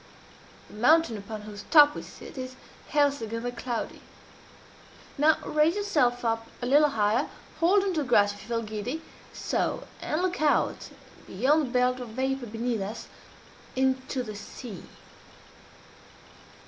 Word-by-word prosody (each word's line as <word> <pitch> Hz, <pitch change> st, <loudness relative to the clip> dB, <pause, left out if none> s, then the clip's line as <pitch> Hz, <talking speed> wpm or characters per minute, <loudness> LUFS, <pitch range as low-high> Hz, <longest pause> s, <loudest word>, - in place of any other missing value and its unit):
The -, -, -13 dB
mountain 305 Hz, +2 st, +4 dB
upon 210 Hz, +1 st, -7 dB
whose 210 Hz, -1 st, -8 dB
top 295 Hz, -2 st, +8 dB
we -, -, -6 dB
sit -, -, -12 dB
is 255 Hz, -1 st, -6 dB, 0.3 s
Helseggen, 275 Hz, -7 st, +1 dB
the 245 Hz, -, -2 dB
Cloudy. 245 Hz, -1 st, -4 dB, 1.1 s
Now 305 Hz, +2 st, +4 dB
raise 305 Hz, +3 st, +3 dB
yourself 275 Hz, -13 st, +1 dB
up 225 Hz, 0 st, 0 dB
a 245 Hz, -, -4 dB
little 295 Hz, +4 st, +5 dB
higher 220 Hz, +2 st, +1 dB, 0.3 s
hold 385 Hz, +4 st, +4 dB
on 390 Hz, -2 st, 0 dB
to 315 Hz, -, 0 dB
the 270 Hz, -, -5 dB
grass 205 Hz, -3 st, +5 dB
if 205 Hz, -, -12 dB
you -, -, -13 dB
feel 230 Hz, -1 st, -1 dB
giddy 220 Hz, +8 st, -4 dB, 0.3 s
so -, -, -1 dB, 0.2 s
and 315 Hz, +4 st, -1 dB
look 360 Hz, -4 st, -1 dB
out, 300 Hz, -1 st, +1 dB, 0.4 s
beyond 275 Hz, +9 st, +2 dB
the -, -, -8 dB
belt 250 Hz, 0 st, +2 dB
of 245 Hz, -2 st, -6 dB
vapor 260 Hz, +2 st, -2 dB
beneath 225 Hz, 0 st, -2 dB
us, 210 Hz, +4 st, -6 dB, 0.7 s
into 260 Hz, 0 st, 0 dB
the 215 Hz, -3 st, -7 dB
sea." 210 Hz, +1 st, -9 dB
250 Hz, 150 wpm, -27 LUFS, 225-295 Hz, 1.1 s, top